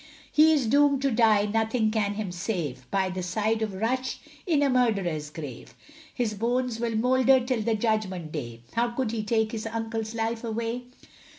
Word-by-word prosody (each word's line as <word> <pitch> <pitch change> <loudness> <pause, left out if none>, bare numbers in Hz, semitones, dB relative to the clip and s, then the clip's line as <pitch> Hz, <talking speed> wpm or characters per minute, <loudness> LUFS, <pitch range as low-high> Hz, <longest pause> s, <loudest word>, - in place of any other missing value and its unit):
He 310 +1 +6
is 290 -5 +2
doomed 280 +3 +3
to 275 - +2
die, 220 -3 +4
nothing 220 +1 +1
can 205 -2 0
him 205 -3 -3
save, 175 - -4
By 195 -1 +1
the 185 0 -4
side 215 +5 0
of 215 -3 -2
Rush 255 +6 -1 0.3
in 305 -5 +3
a - - +4
murderer's 200 - +1
grave; 145 -6 -9 0.4
His 235 -4 -1
bones 240 +2 -1
will 230 -1 -1
moulder 260 +3 +4
till 250 -2 -1
the 225 +1 +1
Judgment 210 -7 -1
day, 120 -7 -6
How 235 +1 +2
could 235 -1 -2
he 230 -2 -2
take 220 0 0
his 225 -1 -4
uncle's 225 0 -3
life 225 +1 -2
away? 230 +2 -3
225 Hz, 180 wpm, -27 LUFS, 205-245 Hz, 0.4 s, He